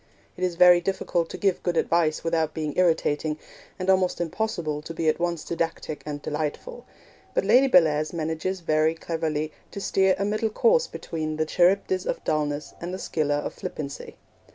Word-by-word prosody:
It 185 - -6
is 180 -2 0
very 180 0 +7
difficult 175 -2 -1
to - - -6
give 195 -3 +1
good 175 -2 -1
advice 165 -2 +1
without 165 -2 0
being 155 -2 -3
irritating, 160 -3 +1 0.4
and 185 - -4
almost 185 -1 +2
impossible 170 -4 -2
to 165 +2 -8
be 160 - -1
at 155 - +2
once 170 -2 -1
didactic 165 -2 -3
and 145 -1 -4
delightful; 155 - -4 0.5
but - - +1
Lady 265 +2 +6
Bellairs 155 - +4
manages 165 +3 -3
very 155 0 +2
cleverly 160 -2 -2 0.2
to - - -7
steer 190 -1 +2
a 200 - -1
middle 215 +2 0
course 475 - +3
between 155 -1 -4
the 155 - +1
Charybdis 185 +2 +2
of - - -2
dulness 150 -1 -1
and 175 +1 -4
the 185 - -4
Scylla 145 -5 -1
of - - -5
flippancy. 140 -2 -6
165 Hz, 175 wpm, -25 LUFS, 155-185 Hz, 0.5 s, very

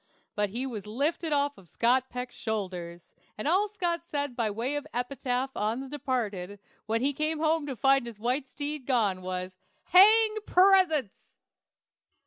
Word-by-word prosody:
But 205 -1 0
he 240 +6 -3
was 215 -6 -6
lifted 295 +8 -1
off 285 0 0
Scott 250 +7 +1
Peck's 250 0 -6
shoulders, 180 -6 -5 0.2
and 215 - -3
all 380 +6 +3
Scott 345 -5 -2
said 285 -5 -3
by 230 -3 0
way 230 +7 -2
of 290 - -4
epitaph 250 +1 -2
on 215 +4 -1
the 270 - -6
departed, 220 -9 -3 0.3
when 225 +1 0
he 280 +2 +2
came 310 +3 -1
home 315 -1 +1
to 270 - -4
find 270 0 +3
his 225 -3 -9
white 255 +5 -1
steed 290 -1 -5
gone, 210 -8 +1
was, 185 0 -5 0.3
"Hang 430 +4 +7
presents!" 360 - +3
260 Hz, 155 wpm, -28 LUFS, 220-300 Hz, 0.3 s, Hang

